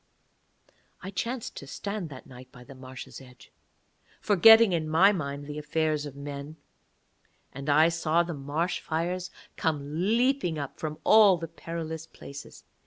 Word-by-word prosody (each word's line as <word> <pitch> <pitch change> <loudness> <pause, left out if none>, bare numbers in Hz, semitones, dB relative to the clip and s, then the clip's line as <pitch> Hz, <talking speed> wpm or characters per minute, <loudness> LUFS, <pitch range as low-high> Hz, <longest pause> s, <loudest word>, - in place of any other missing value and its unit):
I 190 - -6
chanced 230 +5 -4
to 140 - -8
stand 200 +2 -5
that 130 -3 -11
night 130 0 -13
by 125 - -14
the 130 - -13
marsh's 130 0 -10
edge, 125 -1 -17 0.7
forgetting 220 +1 +7
in 160 -2 -1
my 180 +6 +5
mind 140 -6 -4
the 150 +1 -6
affairs 150 -1 -1
of 140 - -10
men; 140 +1 -7 1.0
and 140 +2 -6
I 155 +3 +5
saw 165 0 +1
the 170 0 -5
marsh 150 +5 -2
fires 175 +3 -3 0.3
come 155 +2 -1
leaping 250 - +1
up 140 -2 -6
from 155 -1 -4
all 210 -4 +6
the 165 0 -6
perilous 165 -1 -6
places. 140 -3 -11
160 Hz, 150 wpm, -27 LUFS, 140-180 Hz, 1.0 s, forgetting